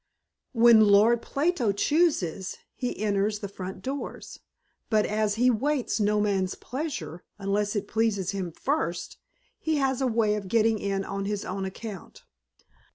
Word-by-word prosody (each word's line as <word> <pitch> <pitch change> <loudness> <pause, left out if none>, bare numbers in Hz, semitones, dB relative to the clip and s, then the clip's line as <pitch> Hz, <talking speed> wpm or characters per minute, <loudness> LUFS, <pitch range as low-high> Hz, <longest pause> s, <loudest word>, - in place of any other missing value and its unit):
When 230 -2 +7
Lord 215 +4 +5
Plato 285 - 0
chooses, 200 - +1 0.2
he 250 - -4
enters 205 0 +1
the 205 - -5
front 190 -1 -8
doors, 275 +2 -6 0.5
but 215 -2 +3
as 210 -1 0
he 250 +3 +4
waits 265 +1 0
no 210 0 +2
man's 195 -3 0
pleasure, 265 - -5
unless 205 +1 -1
it 205 - -2
pleases 210 -4 0
him 190 -4 -4
first, 180 - -2 0.4
he 320 -1 0
has 270 -2 0
a 265 - +2
way 225 -3 +2
of 210 -2 -3
getting 225 +1 +2
in 195 -1 -2
on 195 0 -4
his 205 0 -3
own 190 +1 -3
account. 195 0 -8
210 Hz, 150 wpm, -27 LUFS, 195-240 Hz, 0.5 s, When